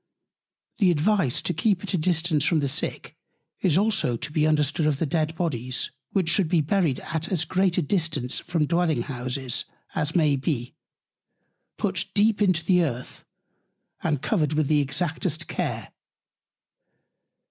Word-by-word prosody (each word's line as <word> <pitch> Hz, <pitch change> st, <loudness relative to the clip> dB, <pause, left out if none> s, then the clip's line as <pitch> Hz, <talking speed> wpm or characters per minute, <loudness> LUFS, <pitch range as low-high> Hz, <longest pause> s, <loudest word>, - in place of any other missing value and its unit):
The 195 Hz, -4 st, +5 dB
Advice 170 Hz, -, +1 dB
to -, -, 0 dB
keep 190 Hz, +3 st, +1 dB
at 200 Hz, -, -4 dB
a -, -, +2 dB
Distance 160 Hz, -2 st, +2 dB
from 165 Hz, 0 st, +3 dB
the 140 Hz, -, 0 dB
Sick, 130 Hz, -, -3 dB, 0.4 s
is 175 Hz, -4 st, +2 dB
also 195 Hz, -, +2 dB
to 140 Hz, -, -5 dB
be 155 Hz, 0 st, +2 dB
understood 150 Hz, 0 st, +2 dB
of 150 Hz, -3 st, +1 dB
the 165 Hz, -, 0 dB
Dead 155 Hz, +2 st, -1 dB
Bodies: 130 Hz, -7 st, -2 dB, 0.2 s
which 190 Hz, -4 st, 0 dB
should 175 Hz, -1 st, +2 dB
be 175 Hz, -1 st, +3 dB
buried 155 Hz, -2 st, +1 dB
at 165 Hz, +4 st, -4 dB
as 170 Hz, -4 st, +1 dB
great 185 Hz, +1 st, +1 dB
a 180 Hz, -, +2 dB
Distance 155 Hz, -6 st, 0 dB
from 165 Hz, -3 st, -1 dB
Dwelling 165 Hz, -5 st, +1 dB
Houses, 130 Hz, -1 st, -3 dB, 0.3 s
as 150 Hz, -1 st, -2 dB
may 155 Hz, -5 st, +4 dB
be; 130 Hz, -3 st, -2 dB, 1.0 s
put -, -, -1 dB
deep 210 Hz, +1 st, +3 dB
in 195 Hz, -3 st, +5 dB
the 180 Hz, 0 st, +4 dB
Earth; 125 Hz, -5 st, -5 dB, 0.8 s
and 145 Hz, -4 st, -1 dB
covered 155 Hz, -9 st, +1 dB
with 155 Hz, 0 st, +1 dB
the 150 Hz, -1 st, +4 dB
exactest 160 Hz, +4 st, -2 dB
Care. -, -, -3 dB
155 Hz, 155 wpm, -25 LUFS, 145-180 Hz, 1.0 s, The